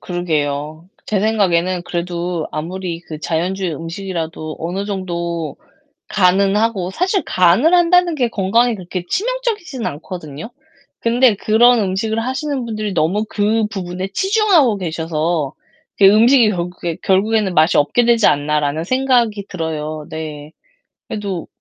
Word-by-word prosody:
그러게요. 155 -2 -3 0.2
제 205 -3 0
생각에는 185 -4 +1
그래도 175 -1 -3
아무리 170 +2 -4
그 155 -3 -9
자연주의 175 +2 -2
음식이라도 165 -2 -5
어느 180 +4 -3
정도 170 -6 -4 0.5
간은 195 0 +3
하고 210 -4 0
사실 370 - 0
간을 185 - +3
한다는 350 -1 +4
게 255 -5 +1
건강에 230 +4 +2
그렇게 180 -2 -6
치명적이진 430 - -2
않거든요. 155 0 -6 0.5
근데 235 -1 +3
'그런 235 +4 +4
음식을 205 +3 -1
하시는 260 +2 -2
분들이 215 -3 -3
너무 180 +6 +1
그 215 +1 +1
부분에 185 -2 -5
치중하고 385 - +3
계셔서 160 -3 -2 0.4
그 200 - +5
음식이 225 +3 +6
결국에 175 -2 -4
결국에는 200 +1 +2
맛이 160 0 +4
없게 150 +12 +2
되지 235 -2 +4
않나.'라는 150 +1 0
생각이 240 -3 +1
들어요. 155 -3 -4
네. 155 -1 -7 0.6
그래도 200 -5 -4
190 Hz, 315 characters per minute, -18 LUFS, 165-225 Hz, 0.6 s, 음식이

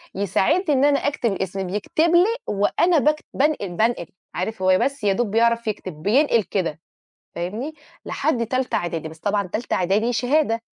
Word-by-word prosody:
يساعدني 290 - +1
إن 270 +2 +3
أنا 285 -1 +3
أكتب 235 -7 0
اسمي، 190 0 -3
بيكتب 210 - 0
لي 395 +7 +4
وأنا 295 - +2
باكت 300 +2 +1
بانقل، 280 - +1
بانقل." 215 -1 0 0.3
عارف 190 +3 -3
هو 185 0 +4
بس 275 -4 -1
يا 200 -1 +3
دوب 230 -1 -1
بيعرف 235 0 +2
يكتب، 190 -4 -4
بينقل 235 +1 +3
كده، 170 -6 -2 0.6
فاهمني، 215 - -4 0.3
لحد 240 -7 0
تالتة 255 +2 -1
إعدادي، 165 -2 -2
بس 160 0 -14
طبعًا 205 0 0
تالتة 215 +6 -4
إعدادي 205 +7 +1
شهادة. 245 0 +1
225 Hz, 160 wpm, -22 LUFS, 195-280 Hz, 0.6 s, لي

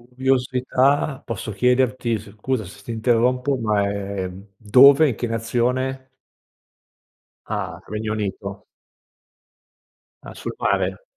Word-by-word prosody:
Curiosità. 130 +2 +1
Posso 110 -1 -5
chiederti, 125 +1 +1
s 100 - -12
scusa 110 +2 -3
se 100 +2 -13
ti 115 - -14
interrompo 125 +4 +1
ma 105 -4 +1
è 100 -1 -3 0.3
dove 135 +8 +7
e 145 - +3
in 115 - -3
che 120 - -3
nazione? 125 +3 -1 1.4
Ah, - - -4
Regno 110 +1 -3
Unito. 100 -1 -5 1.6
Ah, - - -9
sul - - -6
mare. - - 0
120 Hz, 115 wpm, -22 LUFS, 105-130 Hz, 1.6 s, dove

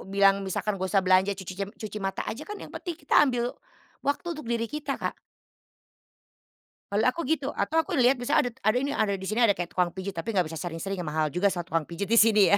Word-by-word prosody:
bilang 195 0 +4
misalkan 195 +1 -2
nggak 190 - -1
usah 195 -2 +3
belanja, 190 +2 +4
cucicem 190 +1 -5
cuci 215 -1 -6
mata 195 -1 -2
aja 230 +9 -6
kan, 420 - -5
yang - - -10
penting 345 -4 -5
kita 290 -4 +4
ambil 245 -3 +1 0.5
waktu 285 +4 -1
untuk 305 -7 -8
diri 235 -1 0
kita, 300 +6 -3
Kak. - - -3 1.8
Kalau 205 +2 +2
aku 255 +7 +2
gitu, 290 -3 0
atau 320 +1 +1
aku - - -5
lihat 255 0 +4
misalnya 245 0 +2
adat 230 - -18
ada 215 +3 +4
ini, 280 - -1
ada 215 -7 +1
di 195 - -4
sini 230 +3 +4
ada 205 - +4
kayak 175 -2 -4
tukang 180 -1 0
pijit 190 +1 -4
tapi 185 +4 -4
nggak 180 -5 +1
bisa 160 - -6
sering-sering 175 +3 -4
ya 175 - -4
mahal 155 0 0
juga 180 +6 -1
sa 175 - -2
tukang 165 -3 -1
pijit 185 +4 -5
di 230 - +4
sini 215 -2 +6
ya. 200 - +6
200 Hz, 235 wpm, -27 LUFS, 185-245 Hz, 1.8 s, sini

